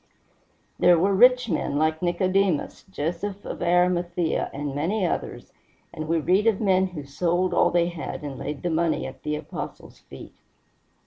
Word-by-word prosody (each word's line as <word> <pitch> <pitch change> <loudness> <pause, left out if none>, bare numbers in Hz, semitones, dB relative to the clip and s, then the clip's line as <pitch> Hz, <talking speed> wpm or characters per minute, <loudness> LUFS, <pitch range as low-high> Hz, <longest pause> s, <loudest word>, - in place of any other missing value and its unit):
There 175 -1 +6
were 195 +4 +2
rich 250 +4 +5
men 155 -6 -1
like 155 +1 +1
Nicodemus, 185 -1 0
Joseph 190 +4 -4
of - - -6
Arimathea, 175 -1 +1
and 145 0 -4
many 180 +8 -1
others, - - -4 0.4
and 155 0 -5
we 165 +1 +1
read 190 +7 +2
of 220 -4 +3
men 190 -3 +2
who 170 -5 -8
sold 175 +6 0
all - - +4
they 175 0 +2
had 165 -3 -6
and 140 -2 -6
laid 150 -1 -5
the 175 - -1
money 165 0 0
at - - -9
the 150 0 -2
Apostles' 150 -1 -8
feet. - - -12
175 Hz, 165 wpm, -25 LUFS, 155-190 Hz, 0.4 s, There